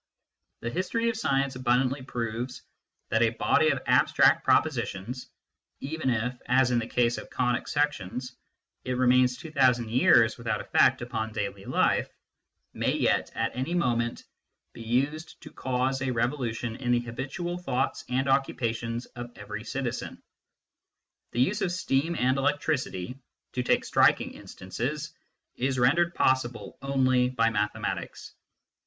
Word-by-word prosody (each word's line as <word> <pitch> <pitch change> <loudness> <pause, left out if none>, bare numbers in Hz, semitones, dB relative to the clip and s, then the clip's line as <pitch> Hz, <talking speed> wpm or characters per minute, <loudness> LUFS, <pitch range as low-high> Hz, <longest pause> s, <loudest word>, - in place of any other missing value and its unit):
The 115 - -3
history 210 - 0
of 230 - -2
science 140 - 0
abundantly 130 +2 +1
proves 120 0 -4 0.5
that 110 - +2
a 115 - +5
body 135 +7 +2
of 140 -4 -1
abstract - - +4
pro - - +6
positions 120 +7 -5 0.5
even 150 0 -2
if, 120 +1 -1
as 125 0 +4
in 120 - +3
the 115 - -4
case 120 -1 +1
of - - -11
conic 125 -1 0
sections, 125 -4 -2 0.5
it 130 - -2
remains 125 0 +4
two 160 - -9
thousand 125 -5 +3
years 115 -2 +4
without 110 -3 -1
effect - - +3
upon 110 -2 -3
daily 100 -1 -4
life - - +1 0.6
may - - 0
yet, - - +1
at - - -1
any 130 +7 -2
moment, 120 -7 0 0.5
be - - -10
used 140 +8 -1
to - - -10
cause 130 +1 -1
a 135 - -1
revolu 120 0 0
tion 115 -1 -4
in 125 -2 -1
the 120 - +2
habitual 135 +9 -4
thoughts 135 -7 -1
and 130 +2 0
occupations 120 -3 0
of 120 -1 -9
every 105 +1 -7
citizen. 130 -1 -4 1.1
The 120 - 0
use 210 +11 +1
of 190 -3 0
steam 165 -2 0
and 130 0 +1
electricity 135 - -1 0.3
to 125 - -1
take 125 - +1
striking - - +3
instances 140 +11 -5 0.4
is 130 +1 0
rendered 170 +8 +3
possible 120 -5 0
only 130 -2 +2
by 115 -3 +2
mathematics. 105 -1 -3
125 Hz, 145 wpm, -27 LUFS, 120-135 Hz, 1.1 s, pro